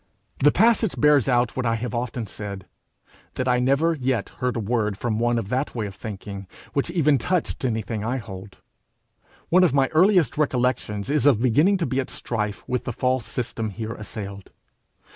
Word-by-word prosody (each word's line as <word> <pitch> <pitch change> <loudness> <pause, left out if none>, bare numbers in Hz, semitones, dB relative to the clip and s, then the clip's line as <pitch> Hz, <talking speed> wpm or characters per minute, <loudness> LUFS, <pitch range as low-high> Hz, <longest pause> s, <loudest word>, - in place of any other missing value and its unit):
The 145 +1 +5
passage 225 -1 +3
bears 150 -4 +4
out 120 -2 +2
what 130 - -1
I 115 - +2
have 115 0 -4
often 120 -1 -3
said 100 -2 -7 0.7
that 130 - -2
I 125 0 +3
never 140 +6 +2
yet 130 -7 -1
heard 125 -1 0
a - - -1
word 105 -2 -1
from 110 -1 -1
one 120 0 +2
of 105 -4 -3
that 130 +3 -1
way 110 -3 -2
of 100 - -6
thinking, 100 -2 -7 0.3
which 140 +3 0
even 150 -5 +3
touched 180 +2 -1
anything 110 -3 -2
I 120 +4 -1
hold. 100 -4 -9 0.9
One 185 +3 +5
of 165 -7 +3
my 135 -1 +3
earliest 175 - +3
recollections 125 -5 0
is 145 -1 +3
of 130 -7 +5
beginning 145 - +3
to 175 - -1
be 130 -1 -1
at 130 - -2
strife 105 -3 -4
with 125 -1 -2
the 120 - -3
false 130 -1 0
system 115 -2 -3
here 110 +2 -5
assailed. 100 -3 -7
125 Hz, 185 wpm, -24 LUFS, 110-140 Hz, 0.9 s, The